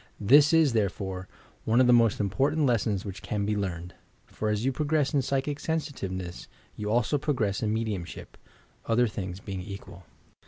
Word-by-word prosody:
This 145 +8 +6
is, 160 -5 +4
therefore, 95 -3 -2 0.4
one 115 +2 +2
of 130 - +6
the 125 - +5
most 115 -3 +4
important 140 +10 +1
Lea 120 -4 +3
sons 100 -2 -2
which 100 -2 -7
can 105 -1 -2
be 105 +1 0
learned, 90 -3 -4 0.3
for 110 - -3
as 105 +2 -1
you 135 - +2
progress 150 +1 0
in 140 - +3
psychic 140 +2 -1
sensitiveness, 95 - -4 0.3
you 105 0 -4
also 120 +6 +1
progress 125 -9 -1
in 105 - 0
mediumship, 110 -6 -4 0.3
— - - -35
other 120 +2 +3
things 95 -2 -5
being 95 -2 -6
equal. 95 -2 -10
110 Hz, 180 wpm, -27 LUFS, 100-135 Hz, 0.4 s, This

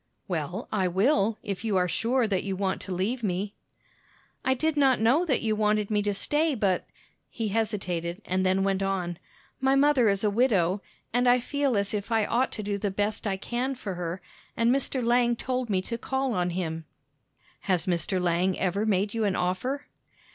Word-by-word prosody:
"Well, 175 +5 -3
I 195 -4 +1
will, 205 - +2
if 200 +1 -4
you 215 -4 +1
are 180 -1 +2
sure 235 +6 +1
that 195 -3 0
you 195 -1 -2
want 190 0 -1
to 190 - -6
leave 200 +8 -1
me." 200 0 -2 0.9
"I 260 - +2
did 315 +4 0
not 270 -3 +4
know 255 +11 +3
that 270 -8 +1
you 220 -1 +1
wanted 210 0 +1
me 210 -1 +2
to 205 0 0
stay, 295 +7 +1
but" 195 -5 0 0.4
he 225 -3 -3
hesitated, 195 -5 -2
and 185 +1 0
then 190 +1 +2
went 195 0 +1
on 185 -3 -2 0.4
"my 265 +1 +3
mother 275 -5 +4
is 200 0 0
a 210 - +2
widow, 200 -5 +2 0.3
and 245 +1 +3
I 250 +1 +5
feel 275 -1 0
as 200 +1 -1
if 210 +2 -3
I 220 -2 +3
ought 245 +5 +1
to 215 - -4
do 200 0 -2
the 205 - -1
best 205 +2 -2
I 195 -1 -1
can 245 +6 -2
for 210 -6 -5
her, 175 +1 -4 0.3
and 230 +1 +4
Mr. 270 -1 -1
Lang 240 0 +3
told 255 0 -2
me 185 -2 +1
to 230 +4 -4
call 265 0 -1
on 180 -3 0
him." 165 -2 -3 0.7
"Has 180 -5 0
Mr. 185 +1 0
Lang 180 +1 +1
ever 195 +3 0
made 200 0 +1
you 225 -1 0
an 195 -2 +1
offer?" 250 +11 -1
205 Hz, 200 wpm, -27 LUFS, 185-245 Hz, 0.9 s, I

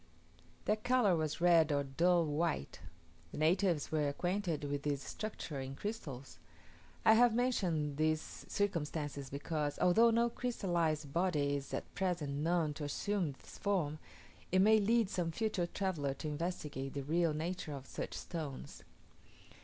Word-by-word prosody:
Their 215 - +2
colour 245 -4 +3
was 155 0 -2
red 165 -3 +5
or 140 -1 +2
dull 170 +5 +3
white. 150 - -1 0.5
The - - -7
natives 170 0 +2
were 150 -2 +1
acquainted 175 0 -1
with 145 0 -2
this 145 -1 -1
structure 185 -9 -5
in 135 0 -5
crystals. 145 - -6 0.7
I 220 - +8
have 235 0 +5
mentioned 175 - 0
these 155 0 -1
circumstances 150 -7 -2
because, 145 +1 -2
although 225 +6 +5
no 235 +1 +3
crystallized 170 - -1
body 155 -5 +1
is 140 -1 -5
at - - -4
present 175 -7 -1
known 165 -2 +1
to 150 - -6
assume 175 +2 -1
this - - -14
form, 165 -7 0 0.5
it 185 - +3
may 215 +3 +6
lead 225 +1 +3
some 175 -3 0
future 195 -3 -1
traveller 170 -8 -2
to 155 - -5
investigate 150 -4 -4
the 140 - -2
real 160 +2 +1
nature 165 0 -3
of 135 -2 -7
such - - -5
stones. 155 -6 -6
165 Hz, 145 wpm, -35 LUFS, 145-190 Hz, 0.7 s, I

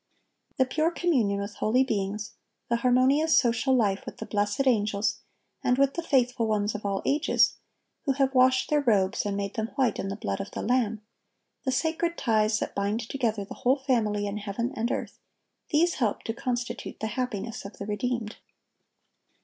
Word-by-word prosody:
The 260 - +4
pure 310 +5 +1
communion 260 - +1
with 200 +1 -6
holy 245 +5 +3
beings, 205 -3 -2 0.4
the 235 - +2
harmonious 260 +6 +4
social 250 +2 +3
life 200 -5 +1
with - - -8
the 220 - -6
blessed 205 +5 0
angels 210 -4 +1 0.4
and 250 - +2
with 275 0 +3
the 340 - -2
faithful 250 -7 +1
ones 210 -1 0
of 210 -1 -4
all 195 -1 -2
ages, 295 +3 +3 0.5
who 275 - +2
have 270 0 +1
washed 255 +1 +4
their 300 -1 +4
robes 210 -4 +2
and 200 -1 -2
made 200 0 -3
them 220 0 -2
white 260 -6 +1
in - - -2
the 195 - -3
blood 100 - -3
of - - -6
the - - -5
Lamb, 225 -3 0 0.6
the 260 - +1
sacred 325 +5 0
ties 215 -2 +2
that - - -3
bind 200 +3 -1
together 225 -6 -1
"the - - -8
whole 260 +3 +3
family 225 -7 0
in 200 +1 -3
heaven 215 +5 -3
and 230 +1 -1
earth,"(1193)—these 340 +3 -2
help 220 -5 -1
to 225 - -3
constitute 245 +1 -4
the - - -3
happiness 230 -1 -3
of 200 - -10
the 200 - -5
redeemed. 225 +1 -2
235 Hz, 180 wpm, -27 LUFS, 205-265 Hz, 0.6 s, The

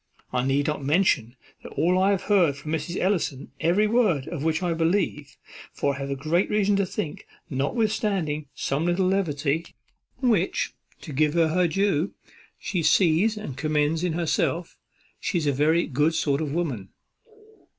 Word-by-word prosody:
I 125 -1 +1
need 135 +2 +1
not 150 -1 -2
mention 140 - +2 0.4
all 175 +3 +2
that 185 - +3
I 190 +1 +3
have 195 -2 +1
heard 180 -9 +3
from 150 +1 -7
Mrs. 160 +2 -2
Ellison, 175 -8 -1
every 175 +6 +3
word 210 - +2
of 160 -3 -5
which 160 +2 0
I 175 -1 +1
believe; 165 -4 -1 0.4
for 140 - 0
I 140 - -7
have 140 0 -3
great 160 +7 +1
reason 205 -1 +2
to 200 -1 +1
think, 150 -4 -5 0.2
notwithstanding 175 - -1
some 140 +4 -1
little 175 +2 +1
levity, 160 -5 0 0.6
which, 220 -8 +1 0.3
to 155 - -8
give 150 +3 +2
her 165 -2 +3
her 180 +2 +2
due, 190 0 0 0.4
she 180 - -2
sees 185 +6 +3
and 210 -11 -6
condemns 155 +3 0
in 180 -3 0
herself, 170 0 -1 0.4
she 180 - -1
is 165 - -1
a 145 - +3
very 155 +5 +2
good 150 +3 +1
sort 140 0 +1
of 150 -3 -2
woman." 140 - -2
165 Hz, 165 wpm, -25 LUFS, 145-185 Hz, 0.6 s, that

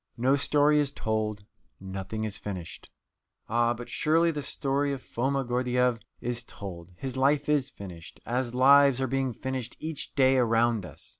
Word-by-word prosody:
No 130 +4 +3
story 145 +1 +3
is 145 -2 +1
told, 110 -4 -2 0.3
nothing 95 +3 -5
is 105 -2 -2
finished. 95 -5 -7 0.6
Ah, 120 +1 +2
but 120 +1 -8
surely 165 +2 +2
the 150 -2 -4
story 140 0 -1
of 135 - -6
Foma 135 +3 -1
Gordyeeff 125 -1 +1 0.2
is 120 0 -2
told; 90 -7 -9
his 130 -1 -5
life 140 +2 +2
is 145 -3 +2
finished, 90 -4 -10
as 125 0 -2
lives 140 0 +6
are 135 - +1
being 135 0 0
finished 130 0 -5
each 155 -2 -5
day 130 -1 +4
around 115 -4 +2
us. 75 - -11
125 Hz, 160 wpm, -28 LUFS, 110-140 Hz, 0.6 s, lives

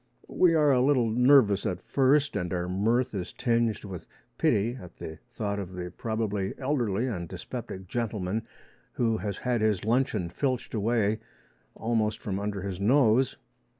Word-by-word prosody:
We 170 -2 +4
are 150 -2 +4
a 125 -2 +4
little 125 -4 +3
nervous 125 -4 +5
at 95 -5 -2
first, 140 +2 +2
and 90 -1 -2
our 90 -1 -1
mirth 115 +7 +1
is 95 -3 -4
tinged 115 -3 0
with 95 -4 -8 0.3
pity 110 +5 +2
at 90 - -12
the 80 0 -8
thought 105 -4 -3
of 95 -2 -6
the 90 -1 -5
probably 105 -3 -2
elderly 125 -6 0
and 90 -10 -4
dyspeptic 95 -1 -7
gentleman 110 -2 -2 0.5
who 115 -2 +1
has 100 -3 -4
had 125 -3 -1
his 105 -3 +1
luncheon 110 -7 +1
filched 130 +3 -2
away 110 -1 +1 0.6
almost 110 -2 0
from 100 -2 -3
under 100 -1 -3
his 95 -2 -4
nose. 125 +2 +3
110 Hz, 155 wpm, -28 LUFS, 100-125 Hz, 0.6 s, nervous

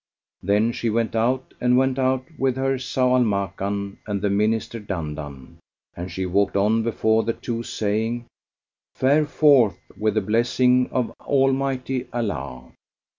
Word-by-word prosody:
Then 105 +5 +2
she 120 0 -2
went 115 +1 -1
out 125 +4 0
and 125 0 +3
went 130 0 +2
out 130 0 +1
with 135 -3 0
her 135 0 0
Zau 130 0 +1
al - - +4
Makan 100 -1 -2
and 105 -1 -1
the 100 0 0
Minister 110 +3 0
Dandan, 75 - -6 0.4
and 90 +2 -6
she 95 - -3
walked 100 +2 +1
on 110 +3 +3
before 110 -1 +1
the 115 +1 -1
two 115 0 -4
saying, 115 +2 -2 0.7
"Fare 145 +3 +3
forth 140 -9 +4 0.2
with 110 -1 0
the 110 - +2
blessing 125 +4 +2
of 125 -3 -1
Almighty 135 -2 0
Allah!" 75 - -4
115 Hz, 145 wpm, -23 LUFS, 100-130 Hz, 0.7 s, al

